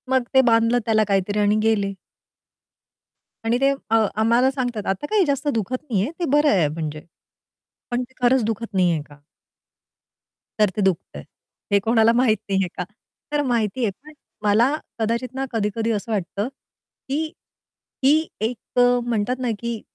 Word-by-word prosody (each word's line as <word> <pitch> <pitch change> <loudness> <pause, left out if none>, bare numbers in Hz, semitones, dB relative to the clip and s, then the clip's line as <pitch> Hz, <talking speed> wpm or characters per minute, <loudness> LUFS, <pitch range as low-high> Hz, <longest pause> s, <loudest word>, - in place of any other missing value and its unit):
मग 260 -1 +3
ते 265 - +7
बांधलं 230 0 +3
त्याला 220 -1 +3
काहीतरी 200 +1 0
आणि 205 0 +3
गेले. 205 -3 +1 1.5
आणि 230 +2 +2
ते 275 - +5 0.2
अ 225 0 +4 0.2
आम्हाला 235 +4 +4
सांगतात, 245 -6 -3
"आता 195 +9 -1
काही 420 -4 +3
जास्त 280 0 -1
दुखत 225 +2 -1
नाहीये. 210 +3 0
ते 345 - 0
बरं 295 +1 +4
आहे 180 -7 +3
म्हणजे." 155 0 -5 0.9
पण 245 +1 0
ते 255 +1 -14
खरंच 250 0 +4
दुखत 225 0 -3
नाहीये 175 -4 +2
का? 145 0 -17 1.4
तर 210 -2 +5
ते 210 - -1
दुखतंय, 170 - -1 0.5
हे 200 - +5
कोणाला 225 0 +4
माहित 235 -3 +3
नाहीये 195 -1 +1
का? 180 - -1 0.5
तर 295 0 +1
माहितीये 235 -1 0
पण 310 +1 -13 0.3
मला 225 +7 +3 0.2
कदाचित 235 +3 -1
ना, 270 0 -1
कधी-कधी 225 0 -1
असं 220 +2 -3
वाटतं 200 +1 -2 0.6
की 290 +4 0 0.8
ही 310 +4 +4
एक 225 +2 -3
अ, 245 0 +5
म्हणतात 240 +2 -1
ना 250 -2 -1
की 235 -2 -4
225 Hz, 155 wpm, -22 LUFS, 205-255 Hz, 1.5 s, ते